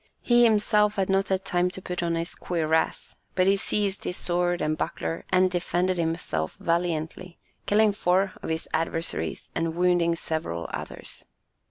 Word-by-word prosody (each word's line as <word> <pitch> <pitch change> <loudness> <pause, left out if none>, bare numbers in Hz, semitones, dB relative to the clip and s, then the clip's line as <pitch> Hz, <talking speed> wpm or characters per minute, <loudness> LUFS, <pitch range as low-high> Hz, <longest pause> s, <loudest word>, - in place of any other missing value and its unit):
He 240 0 +5
himself 210 -1 +3
had 195 -1 0
not 195 0 +2
had 190 0 0
time 180 0 +1
to 185 - -8
put 180 -1 -4
on 170 -1 0
his 165 +1 -3
cuirass, 160 -2 -1 0.2
but 185 - +3
he 195 +1 +5
seized 200 0 -1
his 180 - -2
sword 175 0 0
and 155 0 0
buckler 165 - -3
and 185 0 +3
defended 180 0 0
himself 160 - -1
valiantly, 170 +1 -2 0.3
killing 215 +1 +4
four 190 -1 +1
of - - -5
his 160 0 -2
adversaries 165 +1 -2
and 165 0 -1
wounding 175 -1 +3
several 155 - -3
others. - - -7
180 Hz, 160 wpm, -26 LUFS, 165-190 Hz, 0.3 s, He